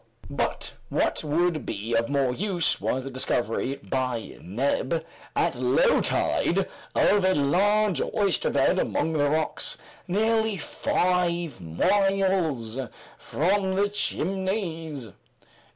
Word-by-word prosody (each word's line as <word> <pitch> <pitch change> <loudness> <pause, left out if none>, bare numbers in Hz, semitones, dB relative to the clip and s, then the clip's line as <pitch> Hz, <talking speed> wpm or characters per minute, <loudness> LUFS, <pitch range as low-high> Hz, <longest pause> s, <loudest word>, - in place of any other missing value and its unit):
But - - -2 0.2
what - - 0
would 160 0 +1
be 110 +2 -4
of 115 +2 +1
more 135 -3 +1
use, 180 +2 0
was 130 - -1
the 135 - -6
discovery, 125 0 -1
by 125 -3 -3
Neb, 135 - -1 0.3
at - - +2
low - - +3
tide, - - +1 0.3
of 205 -2 +4
a 185 0 +3
large 195 +4 +2
oysterbed 200 -6 +1
among 160 - 0
the 145 -2 +2
rocks, 155 +1 0 0.3
nearly 220 +2 +1
five 175 - 0
miles 165 - +1 0.4
from 190 +4 0
the 200 +1 +2
Chimneys. 180 - -2
165 Hz, 105 wpm, -26 LUFS, 135-195 Hz, 0.4 s, of